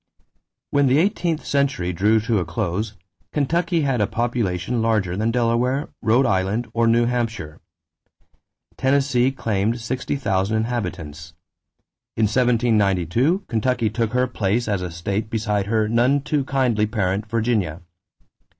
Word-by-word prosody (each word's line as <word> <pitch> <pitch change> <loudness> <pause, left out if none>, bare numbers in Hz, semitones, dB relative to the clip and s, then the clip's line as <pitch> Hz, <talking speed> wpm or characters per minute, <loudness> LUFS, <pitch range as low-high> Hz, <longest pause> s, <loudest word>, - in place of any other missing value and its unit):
= - - -56
When 145 -1 +3
the 130 +2 +4
eighteenth 170 -2 0
century 140 -11 0
drew 105 +6 +3
to 110 -1 +1
a - - 0
close, 100 +5 -3 0.4
Kentucky 165 +4 0
had 135 -6 0
a 105 - +2
population 115 -2 -1
larger 105 -6 +1
than 110 +3 0
Delaware, 120 +3 0
Rhode 120 +5 +3
Island, 100 +3 0
or 115 0 +2
New 120 +1 +4
Hampshire. 115 -10 -3 1.2
Tennessee 130 -2 +2
claimed 110 -2 -1
60,000 110 -4 -1
inhabitants. 85 -9 -4 0.8
In 110 - +2
1792 115 - +2
Kentucky 115 -1 0
took 115 0 -1
her 125 0 +3
place 115 -1 -1
as 100 -3 0
a 90 - -3
state 100 +6 -3
beside 105 -3 -1
her 110 0 +1
none 120 +5 +2
too 150 -2 -1
kindly 125 -6 +1
parent, 105 -1 -1
Virginia. 110 -8 0
115 Hz, 130 wpm, -22 LUFS, 100-125 Hz, 1.2 s, the